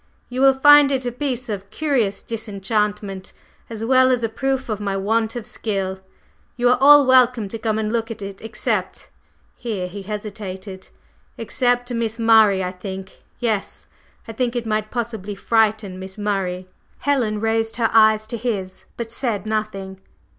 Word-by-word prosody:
"You 255 +1 -3
will 270 -1 +6
find 290 +1 +7
it 260 -2 -1
a 245 - -1
piece 255 -1 -3
of 200 -2 -5
curious 235 -6 -1
disenchantment, 210 -2 -3 0.4
as 225 -1 -5
well 260 +1 +5
as 250 -2 +1
a 225 - 0
proof 265 +3 -2
of 215 -3 -3
my 200 -2 -2
want 220 +3 0
of 240 -3 -5
skill. 195 -5 -3 0.6
You 245 0 +3
are 250 - +4
all 290 0 +8
welcome 250 -4 +4
to 225 - -6
come 220 -1 -1
and 215 0 -2
look 225 -1 -1
at 225 -2 -7
it 195 0 -8
except 225 0 -3 0.2
…" - - -39
here 210 -7 -4
he 200 +3 -8
hesitated, 195 -2 -7 0.5
"except 245 -1 0
Miss 230 -1 -2
Murray. 220 -4 +5
I 180 - -2
think 190 +1 -8 0.2
yes, 220 -5 -2 0.4
I - - -5
think 245 +1 -1
it 240 -1 -2
might 215 -1 -1
possibly 220 -4 -4
frighten 215 -3 +1
Miss 190 +1 -9
Murray." 190 -3 -2 0.3
Helen 245 -7 0
raised 225 0 0
her 230 -1 +1
eyes 215 -1 +5
to 235 +2 -4
his, 200 -5 -4
but 230 -1 -5
said 230 -6 -2
nothing. 195 -3 -4
220 Hz, 170 wpm, -21 LUFS, 200-240 Hz, 0.6 s, all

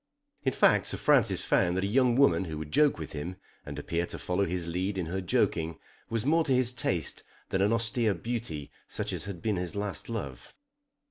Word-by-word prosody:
In 130 - +1
fact - - +4
Sir - - -1
Francis - - +3
found 90 -1 +2
that 95 - 0
a 100 +4 -1
young 125 -3 +4
woman 135 -7 +4
who 80 -2 -5
would 75 -1 -6
joke 150 - +4
with 80 -2 -6
him, 80 +5 -5 0.3
and 75 0 -6
appear 85 +4 -2
to - - -5
follow 90 +2 0
his 90 -1 -2
lead 90 +4 -2
in 90 - -1
her 95 +4 -3
joking, 85 -2 0 0.3
was 115 0 -1
more 165 +3 +4
to 135 - +3
his 125 -1 +1
taste 90 - -1 0.3
than 95 - 0
an 100 +2 +3
austere 115 -2 +2
beauty 105 -9 -4 0.2
such - - -3
as - - -3
had 95 -5 -7
been 105 -3 +1
his 90 0 -3
last 100 +1 -3
love. 80 - -6
95 Hz, 210 wpm, -29 LUFS, 85-115 Hz, 0.3 s, fact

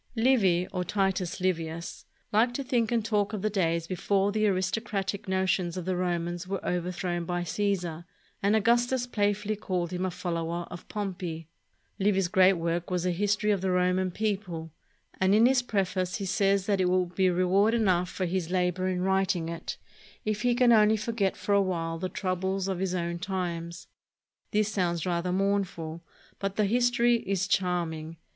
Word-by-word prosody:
Livy, 215 -8 +3
or 180 -1 -1
Titus 190 -1 -1
Livius, 170 -2 -3 0.3
liked 235 +3 +3
to 275 - -2
think 240 -3 0
and 230 -3 +1
talk 210 -1 0
of 210 -2 -4
the 215 - +1
days 170 -4 0
before 195 +3 0
the 215 +1 +2
aristocratic 195 +1 -1
notions 190 -2 0
of 180 - -4
the 185 0 0
Romans 175 0 -2
were 195 0 -2
overthrown 175 0 -2
by 175 +1 -2
Caesar, 175 -3 -2 0.4
and 200 +2 +3
Augustus 240 +3 +2
playfully 205 -2 0
called 185 -4 -2
him 180 +1 -2
a 185 - 0
follower 170 -1 -3
of 175 - -9
Pompey. 180 -6 -4 0.5
Livy's 195 -2 +2
great 185 +1 +5
work 170 0 -2
was 180 -1 -1
a 180 - +2
his 205 +4 +1
tory 210 0 0
of 195 - -2
the 190 - 0
Roman 180 +1 +2
people; 185 -5 -3 0.5
and 190 +2 +4
in 225 +2 +6
his 255 0 +4
preface 185 -5 -1
he 200 - -3
says 195 0 +2
that 200 -2 +1
it 180 - +2
will 185 0 +2
be 185 +1 +1
reward 185 +5 +3
enough 185 -5 +2
for 185 - -2
his 180 -1 -2
labor 180 0 0
in 180 -1 -1
writing 190 -3 +1
it 170 0 -5 0.5
if 215 -1 -1
he 245 -1 +2
can 245 -1 +5
only 215 -1 +5
forget 215 -3 -1
for 205 - -1
a 200 - +5
while 165 -3 -2
the 185 +1 -2
troubles 190 +1 -2
of 190 -2 -2
his 185 -1 -1
own 170 -1 -2
times. 170 -3 -4 0.6
This 215 0 +1
sounds 175 -4 0
rather 180 0 -1
mournful, 185 -4 -1 0.4
but 195 0 -2
the 210 - +2
history 240 +2 +3
is 195 -3 -1
charming. 165 -4 -1
185 Hz, 180 wpm, -28 LUFS, 175-205 Hz, 0.6 s, in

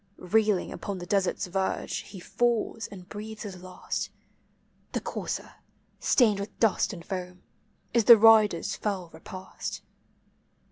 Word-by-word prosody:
Reeling 210 +1 +1
upon 200 -2 -5
the 175 - -7
desert's 200 0 0
verge, 190 +1 -2
he 195 - -10
fallB, 230 +2 0
and 185 -3 -10
breathes 215 +1 -7
his 190 -4 -8
last; 185 0 -4 0.8
The - - 0
courser, - - -5 0.5
stained 215 -6 +4
with 200 +1 -4
<lust 225 -1 +2
and 170 -5 -9
foam, 180 -1 -6 0.5
is 230 -2 +3
the 235 -2 +11
rider's 210 -3 +5
fell 190 -5 -3
repast. 185 +3 -7
200 Hz, 130 wpm, -28 LUFS, 185-220 Hz, 0.8 s, the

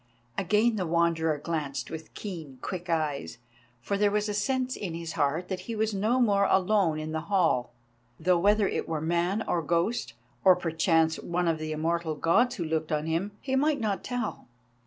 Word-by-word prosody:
Again 215 +4 +2
the 185 -3 -1
Wanderer 165 -2 +2
glanced 150 -2 -3
with 160 -1 -7
keen, 160 -10 -7
quick 180 -2 -5
eyes, 150 -6 -1 0.4
for 200 +11 -2
there 205 0 +4
was 210 +1 0
a 210 - -2
sense 255 +5 0
in 175 -5 -4
his 165 -1 -5
heart 150 +5 0
that 190 -2 -3
he 230 - -2
was 220 0 0
no 215 +6 +1
more 200 -5 +4
alone 190 -4 +3
in 155 0 -4
the 160 - -1
hall, 165 -11 +2 0.5
though 180 +1 +3
whether 205 +2 +4
it - - -3
were 160 -1 -1
man 175 +6 0
or 170 - +1
ghost, 170 - 0 0.3
or, 185 -1 +7
perchance, 165 -1 +2
one 175 0 -1
of 160 -1 +1
the 155 0 -4
immortal 160 +1 -1
Gods 230 +12 +3
who 170 - -3
looked 160 0 -2
on 150 0 0
him, 170 +6 -1
he 265 -1 -1
might 290 +2 +2
not 205 -5 -1
tell. 245 -1 -4
175 Hz, 190 wpm, -28 LUFS, 160-205 Hz, 0.5 s, or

